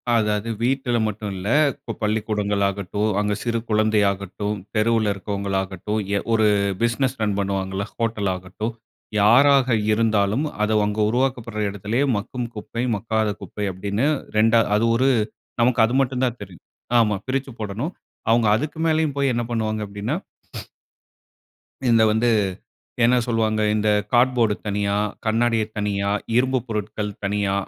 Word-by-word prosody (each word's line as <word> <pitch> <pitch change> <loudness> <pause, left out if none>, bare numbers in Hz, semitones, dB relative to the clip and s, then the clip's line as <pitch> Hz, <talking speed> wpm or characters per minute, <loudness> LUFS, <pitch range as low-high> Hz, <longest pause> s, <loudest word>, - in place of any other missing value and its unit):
அதாவது 105 0 0
வீட்டில 125 -1 +1
மட்டும் 105 -1 -4
இல்ல. 95 - -5 0.3
இப்போ - - -7
பள்ளிக்கூடங்கள் 105 -1 0
ஆகட்டும், 100 +2 -2
அங்க 105 0 0
சிறு 115 -1 0
குழந்தையாகட்டும். 105 -1 +1 0.2
தெருவில 110 -1 +2
இருக்கிறவங்களாகட்டும். 100 0 -3 0.4
ஒரு 110 -1 +3 0.4
பிசினஸ் 125 +3 0
ரன் 105 -2 +1
பண்ணுவாங்கல்ல, 95 0 -2
ஹோட்டல் 110 -4 -1
ஆகட்டும். 95 +5 -5 0.5
யாராக 130 +4 +5 0.2
இருந்தாலும். 110 +4 +2 0.2
அதை 110 +1 +1
அங்க 105 +1 -2
உருவாக்கப்படுற 120 -3 -1
இடத்திலயே 105 +7 -1
மக்கும் 120 +3 -4
குப்பை, 115 +3 -4
மக்காத 110 +1 -1
குப்பை, 105 -1 -5
அப்படின்னு 100 +6 -2 0.3
2 115 +1 +5
அது 110 +2 +2
ஒரு 130 +3 +3 0.5
நமக்கு 120 -1 +3
அது 120 - -2
மட்டும் 130 0 -1
தான் 120 -1 -3
தெரியும். - - -11 0.4
ஆமா 105 -2 +3
பிரிச்சு 135 0 -2
போடணும். 110 - -4 0.4
அவங்க 115 -1 +4
அதுக்கு 150 +7 -3
மேலேயும் 155 -3 +1
போய் 140 -2 +2
என்ன 120 0 -1
பண்ணுவாங்க? 110 -2 -1
அப்படின்னா 105 +8 -3 1.7
இந்த 115 -1 +5
வந்து 115 +2 +2 0.7
என்ன 125 +2 +5
சொல்லுவாங்க, 110 -2 0
இந்த 110 0 +1 0.2
கார்ட்போர்ட் 120 -3 +3
தனியா, 100 0 0 0.3
கண்ணாடிய 115 0 +2
தனியா, 100 -1 -1 0.3
இரும்பு 130 0 +2
பொருட்கள் 105 -1 -3
தனியா 100 0 0
110 Hz, 130 wpm, -22 LUFS, 105-120 Hz, 1.7 s, யாராக